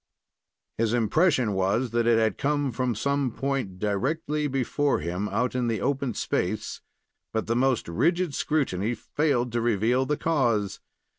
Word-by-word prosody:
His 115 0 +1
impression 125 - +2
was 100 +6 0
that 120 0 +1
it 115 -2 +3
came 145 -1 0
from 125 0 -1
some 140 +3 0
point 135 -7 -3
directly 145 - -1
before 135 +2 0
him 90 +6 -3
out 125 0 -1
on 125 -1 0
the 115 -3 0
open 135 0 -1
space; - - -2 0.5
but 110 - -1
the 115 - 0
most 130 0 +1
rigid 170 - +1
scrutiny 120 -8 0
failed 125 -5 0
to 120 0 0
reveal 120 +3 +1
the 150 - 0
cause. 120 - 0
125 Hz, 145 wpm, -26 LUFS, 110-140 Hz, 0.5 s, it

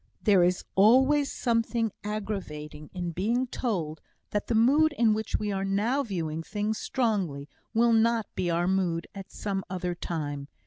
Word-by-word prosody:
There 200 -4 +4
is 180 +1 +2
always 265 +8 +5
something 230 -2 0
aggravating 185 -8 -5
in 175 -2 -4
being 225 +9 0
told, 180 - -3 0.3
that 210 - -1
the 235 - 0
mood 290 +7 +4
in 230 -5 +3
which 220 +1 -2
we 210 -1 -2
are 195 -1 -1
now 210 +8 +1
viewing 165 - -3
things 210 +5 -2
strongly 195 - -1 0.3
will 235 +1 +4
not 225 0 +3
be 175 - -1
our 170 +1 +1
mood 180 -3 0
at 195 -1 -9
some 195 -2 -3
other 180 -1 -2
time. 145 -5 -4
205 Hz, 160 wpm, -28 LUFS, 175-230 Hz, 0.3 s, always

